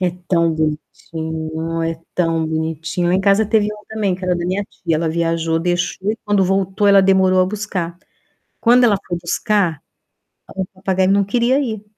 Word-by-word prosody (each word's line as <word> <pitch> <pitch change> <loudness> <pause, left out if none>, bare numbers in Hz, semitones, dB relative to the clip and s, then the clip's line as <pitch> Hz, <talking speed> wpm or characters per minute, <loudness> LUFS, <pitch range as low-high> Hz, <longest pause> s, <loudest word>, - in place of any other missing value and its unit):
É 180 -1 +1 0.2
tão 170 -2 +2
bonitinho, 160 +1 -4
é 165 0 -2 0.2
tão 165 -2 0
bonitinho. 160 +2 -2
Lá 180 - +2
em 190 - +2
casa 200 +2 +3
teve 215 -1 +2
um 210 0 -12
também 210 -4 -1
que 185 - -11
era 180 -1 +1
da 175 - -3
minha 185 +3 -1
tia, 170 -4 -3
ela 165 0 -1
viajou, 165 0 0
deixou 175 +4 -1
e 225 - -8
quando 205 -2 +2
voltou 195 +1 0
ela 200 -1 +7
demorou 190 -1 +4
a 185 - +3
buscar. 185 -4 -4 0.6
Quando 245 +2 +5
ela 210 -4 +4
foi 175 - -2
buscar, 180 -2 0 0.7
o 190 - -2
papagaio 190 0 0
não 200 0 +3
queria 240 +6 +1
ir 220 -7 -3
185 Hz, 180 wpm, -19 LUFS, 165-200 Hz, 0.7 s, ela